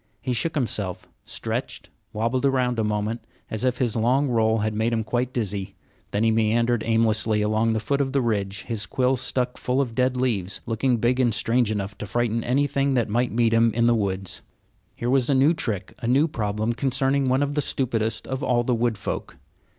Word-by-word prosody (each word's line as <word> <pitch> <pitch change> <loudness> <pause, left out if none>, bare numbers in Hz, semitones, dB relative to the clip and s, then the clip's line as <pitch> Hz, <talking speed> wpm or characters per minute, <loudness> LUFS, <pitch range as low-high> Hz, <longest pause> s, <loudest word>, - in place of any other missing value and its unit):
He 125 +4 -2
shook 155 +8 -1
himself, 105 - -2 0.2
stretched, - - -5 0.2
wobbled 115 +5 -1
around 125 -3 +1
a - - +2
moment, 105 +2 -2 0.3
as 110 +1 -3
if 125 -1 +1
his 120 -4 0
long 130 +5 +2
roll 110 -2 +2
had 110 0 -1
made 110 +2 0
him 110 -2 -1 0.3
dizzy; 100 -5 -3 0.3
then 100 - 0
he 115 - +4
meandered 115 +1 +2
aimlessly 110 -1 +2
along 110 +2 +1
the 110 - 0
foot 140 +6 0
of 135 -1 -1
the 140 - +2
ridge, 100 -4 -1
his 105 -5 -4
quills 130 +4 +1
stuck 125 -1 -1
full 125 +2 0
of 130 -5 -1
dead 125 +1 +1
leaves, 105 -7 -1
looking 120 +2 +1
big 120 +3 +1
and 120 -4 +2
strange 120 0 +1
enough 105 -1 -3
to 105 - -5
frighten 115 +1 0
anything 140 +1 +1
that 120 -3 +1
might 120 +3 +1
meet 115 0 +2
him 115 0 +4
in 115 0 +2
the 120 - +5
woods. 100 -3 -1 0.5
Here 120 - -4
was 130 0 +2
a 140 - +3
new 140 +5 +5
trick, 105 - -3
a 115 - -4
new 135 +6 +4
problem 110 -4 -2
concerning 135 +1 +1
one 130 +2 +2
of 145 0 -2
the 150 - +1
stupidest 115 -5 -1
of 130 +1 -4
all 120 -4 +1
the 125 - 0
wood 115 -2 0
folk. 95 - -5
115 Hz, 205 wpm, -24 LUFS, 110-130 Hz, 0.5 s, the